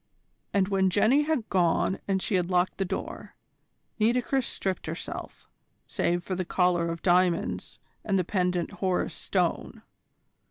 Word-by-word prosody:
And 195 -2 +2
when 190 -1 +3
Jenny 220 +9 +4
had 305 -8 -1
gone 180 +1 +2
and 190 -1 0
she - - -2
had 180 -2 +1
locked 180 +1 +1
the 195 - +1
door, - - -6 0.6
Nitocris 245 +3 +2
stripped 190 -4 -3
herself, 160 +2 -6 0.4
save 175 0 0
for 185 - -4
the 185 0 -1
collar 175 -1 +1
of 165 0 -5
diamonds 180 -1 +1 0.3
and 200 -2 +1
the 185 - +2
pendant 180 -1 0
Horus 190 -2 -1
Stone. - - -2
185 Hz, 145 wpm, -27 LUFS, 175-200 Hz, 0.6 s, Jenny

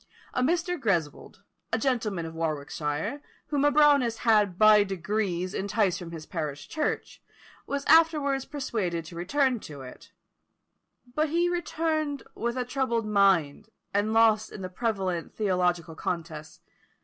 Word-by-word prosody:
A 250 - 0
Mr. 340 +3 0
Greswold, 175 - -2 0.3
a - - +2
gentleman 220 -10 -1
of 160 - -7
Warwickshire, 155 - -3 0.3
whom 290 -2 +1
a 290 - +4
Brownist 285 -6 +4
had 210 -5 +3
by 215 0 +7
degrees 190 -1 -2
enticed 200 -2 0
from 175 -2 -8
his 165 -2 -8
parish 150 -4 -5
church, 310 -2 -3 0.5
was 280 0 -3
afterwards 300 -4 +4
persuaded 200 - -3
to 170 - -10
return 250 +8 +1
to 145 -7 -10
it 125 -1 -12 1.0
but 305 +3 +1
he 345 +3 +2
returned 315 -4 -1
with 235 +2 -3
a 250 - -1
troubled 245 -3 -1
mind, 200 -3 +2 0.2
and 205 +2 +1
lost 220 -1 +3
in 195 - -8
the 185 - -4
prevalent 190 -4 -2
theological 180 -5 0
contests. 160 -2 -5
210 Hz, 135 wpm, -27 LUFS, 170-275 Hz, 1.0 s, by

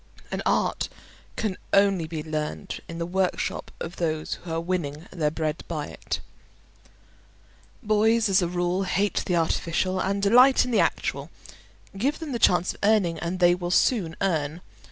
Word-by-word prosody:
An - - -2
art - - +1 0.5
can 210 -5 -2 0.2
only 195 -4 +4
be 155 -1 -5
learned 155 +4 -4
in 165 - -6
the 170 - -2
workshop 185 +1 -1
of 165 - -6
those 155 -2 -1
who 175 - -8
are 165 - 0
winning 165 -3 -3
their 155 -4 0
bread 155 0 -3
by 155 -3 -3
it. - - -5 1.6
Boys, 220 +1 +3
as 195 0 +4
a 175 - +1
rule, 175 +1 0
hate 195 +2 0
the 180 - +1
artificial, 170 +3 0
and 200 +1 -1
delight 250 +6 +6
in 250 - -4
the 230 - +3
actual; - - 0 0.7
give 265 +9 0
them 320 -3 -6
the 240 - -2
chance 180 -4 +3
of - - -18
earning, 200 -6 +2
and 170 +3 -3
they 175 -1 +5
will 175 0 -3
soon 180 -3 +2
earn. 160 -3 -1
180 Hz, 165 wpm, -25 LUFS, 165-200 Hz, 1.6 s, delight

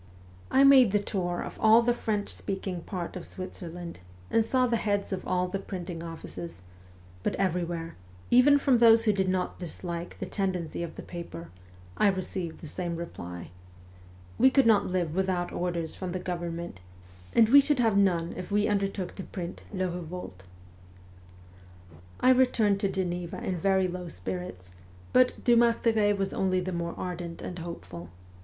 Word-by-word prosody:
I 270 - +5
made 265 -7 +7
the - - +5
tour 180 -4 -2
of - - -8
all 220 +2 +7
the 240 +1 +3
French 210 -3 -2
speaking 190 -2 -4
part 175 -2 -5
of 180 - -5
Switzerland 175 - -8 0.3
and 225 - +4
saw 255 +3 +2
the 235 -1 +1
heads 205 -2 -1
of 185 - -5
all 180 0 +1
the 195 +2 -3
printing 180 -3 -6
offices, 90 - -8 0.6
but - - -1
everywhere, 170 -3 -2 0.4
even 260 +4 +7
from 270 -4 +3
those 230 -1 +7
who 215 -2 +3
did 190 -1 0
not 185 -1 -1
dislike 170 0 -5
the - - -4
tendency 185 -5 -2
of 170 -1 -5
the - - -8
paper, 85 - -8 0.5
I 210 - +4
received 185 -3 -2
the - - -8
same 175 +2 -3
reply: 90 - -7 0.4
' 90 0 -22
We 260 - +7
could 270 -1 +4
not 220 -3 +4
live 180 -4 -1
without 185 -1 0
orders 170 -2 -2
from 185 -2 -5
the 185 - -2
government, 170 - -5 0.6
and 225 - +6
we 280 +3 +9
should 285 0 +2
have 225 -4 +2
none 175 -4 +2
if 185 - -6
we 205 0 +2
undertook 195 -3 -1
to 190 - -5
print 175 -2 -6
" - - -21
Le 185 -3 -1
Kevolte." 170 - -7 0.8
' 90 -1 -21
I 255 - +6
returned 235 -6 +3
to 200 - 0
Geneva 180 -2 -3
in 185 - -2
very 190 +1 +2
low 180 0 -5
spirits, 90 - -6 0.4
but 255 0 +3
Dumartheray 230 -3 +4
was 195 -1 -1
only 185 -1 +1
the 185 0 -3
more 170 0 -3
ardent 175 -2 -5
and 180 - -6
hopeful. 90 - -8
180 Hz, 170 wpm, -28 LUFS, 170-205 Hz, 0.8 s, we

